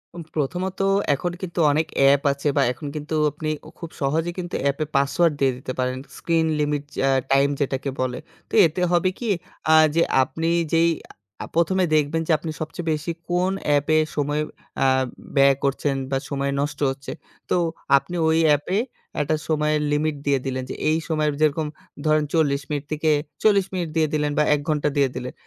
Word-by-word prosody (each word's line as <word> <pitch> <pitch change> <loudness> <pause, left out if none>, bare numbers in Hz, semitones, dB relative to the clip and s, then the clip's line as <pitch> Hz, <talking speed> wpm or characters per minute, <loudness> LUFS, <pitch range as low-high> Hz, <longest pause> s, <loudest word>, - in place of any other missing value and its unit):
উম 170 - -6
প্রথমত 180 +6 -2 0.3
এখন 175 +5 -2
কিন্তু 175 -2 -4
অনেক 155 +2 +1
অ্যাপ 140 0 +5
আছে 140 +2 -3
বা - - +5
এখন 125 +4 -7
কিন্তু 150 +1 -4 0.2
আপনি 155 +1 -4 0.2
উ - - -10
খুব 170 -2 -7
সহজেই 160 +5 0
কিন্তু 175 0 -4
অ্যাপে 140 +2 0
পাসওয়ার্ড 140 +4 +3
দিয়ে 135 -1 +3
দিতে 130 0 -6
পারেন 130 0 0 0.2
স্ক্রিন 165 -1 +1
লিমিট 150 -1 0
চ্যা 135 - +1 0.2
টাইম 140 +1 +4
যেটাকে 135 0 -1
বলে, 125 -1 -1 0.3
তো - - -21
এতে 165 +3 -1
হবে 175 +1 +3
কি 235 - -3 0.4
আ - - +8 0.2
যে 170 - +4 0.2
আপনি 160 +6 -2 0.2
যেই 165 +1 +4 0.5
আ - - -5
১ম 170 +3 +2
এ - - +4
দেখবেন 155 +2 +1
যে - - +1
আপনি 160 +1 -5
সবচেয়ে 165 +2 -4
বেশি 155 +2 -2 0.2
কোন 180 +2 +1 0.2
অ্যাপে 145 +2 +3 0.2
সময় 145 +1 0 0.4
আ - - +4 0.5
ব্যয় 140 0 +6
করছেন 140 0 0 0.2
বা 135 - +2
সময় 140 -1 -1
নষ্ট 145 0 -3
হচ্ছে 135 +1 -8 0.4
তো, - - +2 0.4
আপনি 140 +6 -4
ওই 160 - +3
অ্যাপে 150 +7 +2 0.4
একটা 150 +2 +1
সময়ের 150 -1 +1
লিমিট 150 +1 +1
দিয়ে 140 -1 +2
দিলেন 130 -1 -2
যে - - -4
এই 155 - +3
সময়ের 155 -2 0
যেরকম 155 0 +2 0.4
ধরে, 155 0 +4
ন - - -3
৪০ 145 -4 +2
মিনিট 145 -2 -2
থেকে 155 +1 +1 0.3
৪০ 200 -3 +4
মিনিট 175 -3 -2
দিয়ে 160 -1 +3
দিলেন 150 -1 +1
বা 150 - +4
১ 145 - -3
ঘণ্টা 150 -1 +1
দিয়ে 140 -2 +3
দিলেন। 125 0 -5
150 Hz, 185 wpm, -23 LUFS, 140-165 Hz, 0.5 s, আ